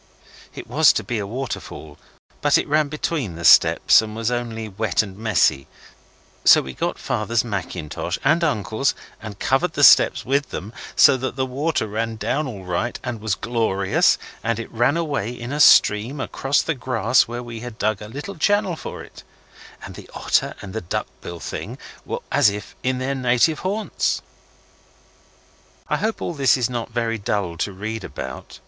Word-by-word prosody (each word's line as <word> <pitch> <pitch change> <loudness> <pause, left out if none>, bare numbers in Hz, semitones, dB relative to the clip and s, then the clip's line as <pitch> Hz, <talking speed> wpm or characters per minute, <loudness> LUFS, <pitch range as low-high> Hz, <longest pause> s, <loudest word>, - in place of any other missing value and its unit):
It - - -7
was - - +5
to - - -2
be 110 +3 -3
a 100 - -4
waterfall, 105 - -6 0.4
but - - +4
it - - -2
ran 150 0 +2
between 145 - -3
the 85 0 -6
steps - - +6
and 110 -1 -7
was 115 +1 -1
only 115 -2 -3
wet 110 0 0
and 100 -3 -9
messy; 100 -10 +1 0.8
so - - +7
we 65 - -7
got - - -2
Father's 110 +2 -1
mackintosh 90 -7 -4
and 160 +5 +3
uncle's 125 -3 0 0.3
and 105 -2 -8
covered 145 +10 +1
the 145 - 0
steps - - +6
with 140 +2 0
them, 105 +5 -7 0.2
so 140 - +6
that 130 -1 -4
the 130 -1 0
water 140 +2 -1
ran 110 +2 -3
down 125 +8 -1
all 100 -7 -8
right 90 +7 -2
and 120 -3 -5
was 110 0 0
glorious, 110 -5 +1 0.3
and 115 -1 0
it 115 - -7
ran 120 +7 +2
away 145 -10 -2
in 120 0 -7
a 145 - -3
stream 120 0 +5
across 135 +1 0
the 165 - -1
grass 125 -2 +2
where 120 +1 -5
we 120 -1 -8
had 120 -1 -8
dug 110 -1 -1
a 105 - -7
little 145 - -7
channel 205 +1 +1
for - - -8
it - - -14 0.6
and - - -8
the - - -12
otter - - 0
and 95 - -8
the 110 - -3
duck 85 - -3 0.2
bill 85 -1 -7
thing - - -6 0.3
were - - -3
as - - +5
if 100 0 -7
in 130 0 0
their 130 +2 -2
native 130 +4 +2
haunts. 205 +3 -1 1.7
I - - +1
hope 220 +1 -2
all - - -3
this 135 -4 +3
is 125 0 -1
not 120 -2 -4
very 115 -1 -2
dull 100 -4 -2
to 100 - -2
read 110 +3 -5
about. 65 -6 -8
115 Hz, 180 wpm, -22 LUFS, 105-135 Hz, 1.7 s, so